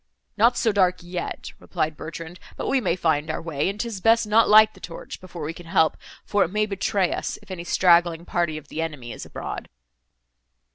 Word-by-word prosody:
"Not 235 +3 +4
so 225 - +2
dark 185 -3 +3
yet," 175 0 -5
replied 155 0 -2
Bertrand, 165 +3 -8 0.2
"but - - -3
we 270 - +2
may 180 -6 +1
find 160 -3 0
our 160 - -2
way, 165 0 -1
and 200 +2 -5
'tis 225 -4 -4
best 225 +1 +4
not 220 +2 +4
light 215 0 +7
the 190 - -16
torch, 170 -2 -8
before 175 -3 -8
we 155 +2 -3
can 170 0 -12
help, 160 -3 +3 0.3
for 205 -1 +2
it - - -1
may 210 +3 +1
betray 195 -2 0
us, - - -3
if 205 - -13
any 175 -2 -5
straggling 170 -1 +3
party 170 -4 -1
of 155 - -10
the 160 - -3
enemy 145 -7 -5
is - - -8
abroad." - - -6
175 Hz, 205 wpm, -24 LUFS, 165-205 Hz, 0.3 s, light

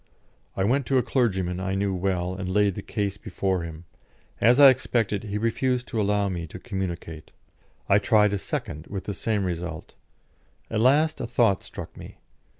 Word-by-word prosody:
I 95 - +1
went 130 +6 +1
to 135 - +2
a 125 - +3
clergyman 95 -8 0
I 95 0 -2
knew 100 0 0
well, 90 -1 -1
and 95 -1 -5
laid 100 +1 +2
the - - -6
case 100 -2 -3
before 95 -2 -1
him; 85 0 -8 0.5
as 120 +4 +5
I 140 -2 +10
expected, 115 -5 -1
he 105 0 -3
refused 125 +3 0
to 110 - -1
allow 100 0 +1
me 85 -3 -4
to 80 - -9
communicate. 90 -6 -5 0.6
I 100 - +5
tried 105 0 +3
a 100 - -1
second, 75 -3 -5
with 100 -1 -5
the 100 - -4
same 105 +1 -1
result. 85 -2 -5 0.8
At 110 -1 0
last 150 +6 +3
a - - -3
thought 115 -5 +2
struck - - -9
me. - - -11
100 Hz, 180 wpm, -25 LUFS, 95-115 Hz, 0.8 s, I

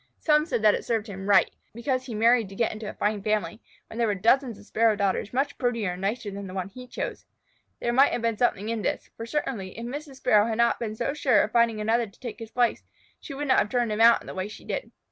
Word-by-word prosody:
Some 300 0 +2
said 225 - -1
that 210 -1 +6
it - - -2
served 225 -3 -1
him 200 -4 -8
exactly 200 - +5
right, - - -37 0.2
because 255 +2 -1
he 235 - -5
married 230 -1 +3
to 195 - -11
get 230 - +1
into 215 -1 -6
a - - -7
fine 210 0 -1
family, 210 -1 -1 0.2
when 225 - -9
there 230 - +2
were 205 - 0
dozens 230 +4 +2
of 205 - -15
Sparrow 225 0 +2
daughters 200 0 -1
much 275 +3 -1
prettier 235 -7 0
and 180 +1 -7
nicer 205 +1 -2
than 200 0 -7
the 185 - -8
one 190 0 -3
he 250 +5 -11
chose. - - -5 0.5
There 240 - -1
may 270 +3 +6
have 240 - -3
been 230 -1 +1
something 215 -3 0
in 230 -1 -2
this, - - -3
for 230 - -7
certainly 230 -9 -3
if 230 - -5
Mrs. 280 +3 -6
Sparrow 215 -4 +3
had 220 -1 -2
not 235 0 +2
been 215 -2 -4
so 240 +5 -2
sure 260 -8 +3
of 210 - -3
finding 235 -2 +3
another 225 +2 +1
to 205 - -20
take 240 -2 -7
his 225 -1 -8
place, 240 0 +1 0.4
she 280 - -8
would 290 +1 -3
not 260 - +5
have 210 - 0
turned 240 -2 0
him 210 +1 -1
out 230 0 +7
in - - -14
the - - -7
way 190 +1 -3
she 210 - -12
did. - - -4
230 Hz, 275 wpm, -26 LUFS, 210-245 Hz, 0.5 s, out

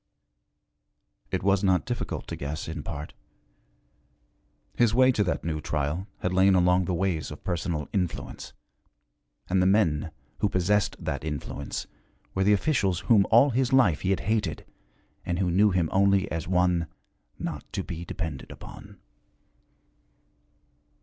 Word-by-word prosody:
It - - -2
was 100 0 +2
not 95 -2 +2
difficult 120 -1 -4
to - - -3
guess, 75 +2 -5
in 80 -1 -5
part. 75 +1 -7 1.6
His 115 -2 +3
way 130 +1 +6
to 110 -4 +1
that 90 - -2
new 80 -2 -2
trial 75 +6 -2
had 90 - -1
lain 95 +1 +5
along 90 0 +3
the 90 - -1
ways 85 -3 -1
of - - -10
personal 85 -4 -2
influence, 90 -5 -3 1.0
and 90 0 +2
the 90 - +3
men 90 -7 +2 0.3
who 105 - +2
possessed 95 +2 +1
that - - -2
influence 70 -2 -4 0.5
were 95 - +1
the 100 - +4
officials 100 - +1
whom 100 +2 +4
all 120 +5 +6
his 125 +1 +1
life 120 - +4
he 95 - -1
had 95 - +1
hated 110 +1 -1 0.6
and 85 - -2
who 90 -2 0
knew 100 +4 +4
him 90 -4 +1
only 100 0 +3
as 80 -1 -3
one 90 -2 +2 0.5
'not - - -6
to - - -2
be 85 0 -6
depended 80 -5 -5
upon.' - - -11
90 Hz, 145 wpm, -27 LUFS, 85-100 Hz, 1.6 s, way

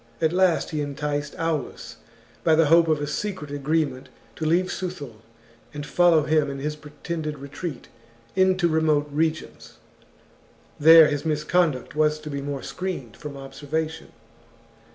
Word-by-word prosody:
At 160 0 +1
last 185 -2 +2
he 155 -2 -2
enticed 145 0 -3
Aulus 165 -3 -3 0.5
by 160 -2 +4
the 165 0 +4
hope 165 +2 +5
of 155 -2 +2
a 145 - -2
secret 155 -1 -4
agreement, 145 -2 -1 0.3
to 160 - -3
leave 180 +3 +2
Suthul 165 -11 -6 0.6
and 145 0 -5
follow 170 -1 +4
him 155 -1 +2
in 140 - -5
his 150 +2 -3
pretended 150 +1 -6
retreat 140 +1 -7 0.5
into 185 -1 +3
remote 155 -2 +2
regions. 155 +1 -3 1.0
• - - -9
[There 160 0 +9
his 145 -1 -2
misconduct 155 -2 0
was 155 0 +2
to 150 0 -7
be 140 0 -3
more 140 -1 -5
screened 170 - -5
from 145 -2 -8
observation. 150 +4 -5
155 Hz, 145 wpm, -24 LUFS, 145-165 Hz, 1.0 s, There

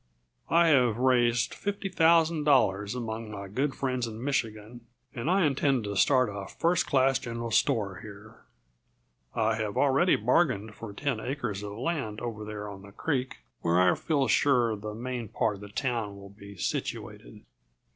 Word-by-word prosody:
I 170 0 +5
have 125 -7 +4
raised 120 -2 +2
fifty 200 0 -3
thousand 165 -3 +3
dollars 105 -7 +2
among 115 -2 -5
my 100 -2 -7
good 135 +8 -1
friends 125 -3 -1
in 110 +1 -7
Michigan, 115 -4 -3 0.3
and 125 +6 -3
I 185 -1 +3
intend 135 -3 +1
to 100 -1 -4
start 130 +5 +4
a 100 -1 -6
first 175 +2 +1
class 135 -1 +3
general 115 -1 -5
store 100 -3 +1
here. 110 +2 -12 0.9
I 110 -1 +1
have 110 -2 -3
already 145 +6 +4
bargained 110 - +1
for 110 0 -8
ten 130 +3 -2
acres 125 -5 -3
of 105 -1 -6
land 120 -3 -3
over 115 -3 -5
there 105 -1 -6
on 100 -1 -9
the 100 +1 -13
creek, 130 +2 -3 0.2
where 85 +1 +2
I 90 -1 +5
feel 140 -5 0
sure 120 0 +3
the 105 +1 -7
main 120 0 -4
part 105 -1 -1
of - - -15
the 105 - -9
town 115 -3 -2
will 100 0 -11
be 100 0 -13
situated. - - -4
115 Hz, 165 wpm, -28 LUFS, 105-135 Hz, 0.9 s, I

